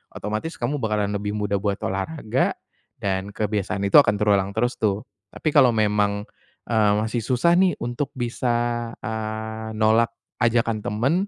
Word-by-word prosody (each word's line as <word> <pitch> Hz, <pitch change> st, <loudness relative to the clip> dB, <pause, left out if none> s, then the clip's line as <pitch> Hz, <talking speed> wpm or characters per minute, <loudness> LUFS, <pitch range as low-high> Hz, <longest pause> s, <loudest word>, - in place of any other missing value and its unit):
otomatis 110 Hz, -, -4 dB
kamu 135 Hz, +5 st, -2 dB
bakalan 105 Hz, -3 st, 0 dB
lebih 105 Hz, 0 st, -2 dB
mudah 105 Hz, -1 st, -1 dB
buat 100 Hz, 0 st, 0 dB
olahraga 105 Hz, +6 st, -1 dB, 0.4 s
dan 95 Hz, +1 st, -3 dB
kebiasaan 105 Hz, -2 st, -1 dB
itu 100 Hz, +9 st, +7 dB
akan 125 Hz, -, +4 dB
terulang 100 Hz, -1 st, +1 dB
terus 120 Hz, +2 st, 0 dB
tuh. 105 Hz, -1 st, 0 dB, 0.2 s
Tapi 155 Hz, +9 st, -2 dB
kalau 130 Hz, -6 st, +5 dB
memang, 105 Hz, -1 st, +1 dB, 0.5 s
eee, 105 Hz, -2 st, +4 dB
masih 110 Hz, +3 st, -1 dB
susah 125 Hz, +8 st, +2 dB
nih 185 Hz, -1 st, +3 dB
untuk 120 Hz, +4 st, -2 dB
bisa, 120 Hz, -1 st, -1 dB, 0.2 s
eee, 110 Hz, 0 st, -4 dB
nolak 110 Hz, +2 st, +3 dB, 0.2 s
ajakan 115 Hz, -2 st, +2 dB
temen. 110 Hz, +7 st, 0 dB
110 Hz, 145 wpm, -23 LUFS, 105-120 Hz, 0.5 s, itu